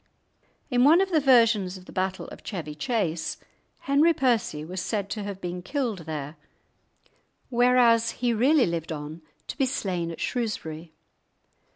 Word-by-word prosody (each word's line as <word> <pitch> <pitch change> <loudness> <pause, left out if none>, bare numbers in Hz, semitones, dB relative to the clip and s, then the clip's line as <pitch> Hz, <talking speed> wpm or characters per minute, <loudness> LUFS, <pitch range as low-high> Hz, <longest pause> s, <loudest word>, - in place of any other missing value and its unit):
In 245 0 +3
one 310 +6 +7
of 385 0 +1
the 320 - +4
versions 230 -8 +4
of 185 - -14
the - - -12
battle 190 0 -2
of - - -11
Chevy 165 -7 -6
Chase, 175 - -2 0.4
Henry 295 +4 +3
Percy 230 - 0
was 180 +2 -5
said 200 -1 -3
to 215 - -3
have 200 -1 -6
been 180 -1 -5
killed 220 - -3
there, 150 0 -5 1.1
whereas 240 -2 +4
he 245 -1 0
really 260 +4 +4
lived 170 -1 -3
on 155 +1 -6 0.2
to - - -6
be 270 -2 +1
slain 185 -10 -2
at 165 - -7
Shrewsbury. 170 -9 -3
205 Hz, 155 wpm, -26 LUFS, 170-250 Hz, 1.1 s, one